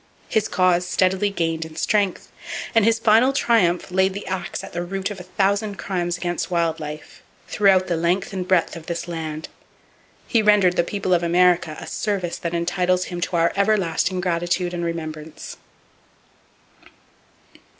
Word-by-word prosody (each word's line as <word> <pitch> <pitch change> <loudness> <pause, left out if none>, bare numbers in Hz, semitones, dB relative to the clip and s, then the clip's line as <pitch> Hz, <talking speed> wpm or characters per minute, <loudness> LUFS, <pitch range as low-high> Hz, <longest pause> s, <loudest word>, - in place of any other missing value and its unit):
His 215 -1 +1
cause 180 -1 +2
steadily 185 +2 +2
gained 165 -4 -1
in 160 -1 -10
strength; 200 +3 0 0.4
and 225 -3 +4
his 225 0 +4
final 225 +3 +4
triumph 195 -10 +2
laid 190 +1 +2
the 200 - -6
axe 185 -2 -4
at - - -10
the 175 - -2
root 195 +3 -3
of 205 - -7
a - - -8
thousand 200 +1 +1
crimes 175 -3 -2
against 175 0 -3
wild 170 -2 0
life, 150 0 -8 0.3
throughout 195 -2 +3
the 175 - -1
length 175 +5 0
and 185 -1 -3
breadth 185 -3 +2
of 165 -1 -10
this 170 0 -4
land. 160 -2 -5 0.8
He 230 - +3
rendered 205 -4 +4
the 170 - +3
people 190 0 -1
of 175 - +3
America 175 -2 +2
a - - -8
service 195 -5 -2
that 170 0 -3
entitles 180 +1 +1
him 175 - -4
to 175 - -2
our 170 0 +2
everlasting 190 -3 +1
gratitude 175 0 -1
and 175 -1 -3
remembrance. 155 -2 -6
180 Hz, 160 wpm, -22 LUFS, 170-195 Hz, 0.8 s, and